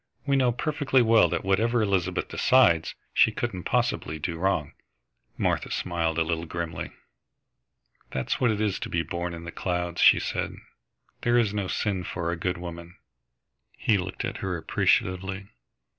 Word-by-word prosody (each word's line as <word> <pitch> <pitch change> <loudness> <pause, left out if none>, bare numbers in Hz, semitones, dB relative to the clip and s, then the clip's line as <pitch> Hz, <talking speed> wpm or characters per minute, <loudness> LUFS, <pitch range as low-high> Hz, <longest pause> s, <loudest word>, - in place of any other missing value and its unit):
We 140 -1 +2
know 130 -2 +3
perfectly 140 0 +1
well 110 -6 +5
that - - -2
whatever 110 +4 +2
Elizabeth 95 -3 0
decides, 100 -12 +3 0.2
she - - +5
couldn't 90 -2 -4
possibly 75 - 0
do 85 +2 -3
wrong." 90 -6 0 0.7
Martha - - 0
smiled 85 -2 -1
a 85 - +3
little 80 0 -2
grimly. 85 -1 -4 1.2
"That's 65 -1 -2
what 125 - +4
it 105 -2 0
is 105 -3 0
to - - -5
be 85 -1 0
born 85 0 -4
in 85 - -9
the 85 - -6
clouds," 90 -1 -2
she - - +7
said. - - -3 0.7
"There 120 0 +3
is 110 -4 +2
no 100 -3 -2
sin 95 -1 -1
for 85 -1 -3
a - - -1
good 90 +2 -2
woman." 85 0 -8 0.8
He 105 -3 +2
looked 95 +1 -4
at - - -4
her 90 -2 -3
appreciatively. 95 +3 0
90 Hz, 160 wpm, -26 LUFS, 85-105 Hz, 1.2 s, she